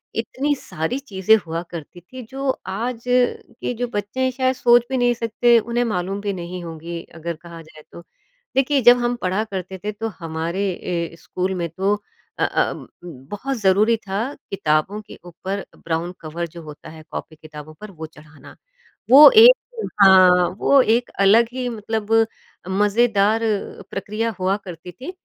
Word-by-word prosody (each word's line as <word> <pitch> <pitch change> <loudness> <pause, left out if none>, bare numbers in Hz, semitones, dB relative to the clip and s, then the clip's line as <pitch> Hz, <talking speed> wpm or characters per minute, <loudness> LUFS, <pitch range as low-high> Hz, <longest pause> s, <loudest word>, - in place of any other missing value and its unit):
इतनी 265 +6 -1
सारी 185 - -4
चीज़ें 220 -5 +2
हुआ 165 +1 -3
करती 170 +1 -9
थी 255 +8 -11
जो 275 0 -2 0.3
आज 230 +2 -4
के 250 0 0
जो 245 +1 -3
बच्चे 205 +5 -4
हैं 260 0 +2
शायद 260 0 0
सोच 240 -1 +5
भी 265 - -1
नहीं 245 -1 +3
सकते, 235 +1 +2
उन्हें 235 +2 -1
मालूम 195 +3 -3
भी 205 -1 -2
नहीं 175 0 -6
होंगी 165 +1 -7 0.2
अगर 170 0 -3
कहा 170 +1 -12
जाए 155 -1 -16
तो। 170 - -11 0.6
देखिए, 275 +1 +3
जब 245 +1 +7
हम 240 0 -1
पढ़ा 190 +3 0
करते 190 -2 -6
थे 210 - -2
तो 225 +2 -4
हमारे 165 +3 -3
ए, 170 -1 -4
स्कूल 185 +3 -3
में 170 -2 -2
तो 190 +5 0 0.4
अ - - +2
अ - - 0
अम, - - -8 0.2
बहुत 180 - -6
ज़रूरी 210 +3 +3
था 200 0 -4 0.3
किताबों 190 +2 0
के - - -13
ऊपर 190 +3 -5
ब्राउन 165 +2 -3
कवर 165 +2 -5
जो 170 - -9
होता 150 +1 -11
है 160 0 -12
कॉपी 155 - -7
किताबों 155 0 -11
पर 210 -1 -9
वो 160 - -5
चढ़ाना। 155 0 -16 0.5
वो 285 +2 +11
एक 475 +3 +9 0.5
हाँ, 180 -2 +6
वो 280 - +4
एक 235 +2 +1
अलग 225 +4 +5
ही 255 -1 -3
मतलब 220 -1 -4 0.6
मज़ेदार 210 +2 +2 0.5
प्रक्रिया 215 +3 -3
हुआ 190 +2 +1
करती 180 -1 -9
थी 260 - -8
200 Hz, 165 wpm, -21 LUFS, 170-235 Hz, 0.6 s, वो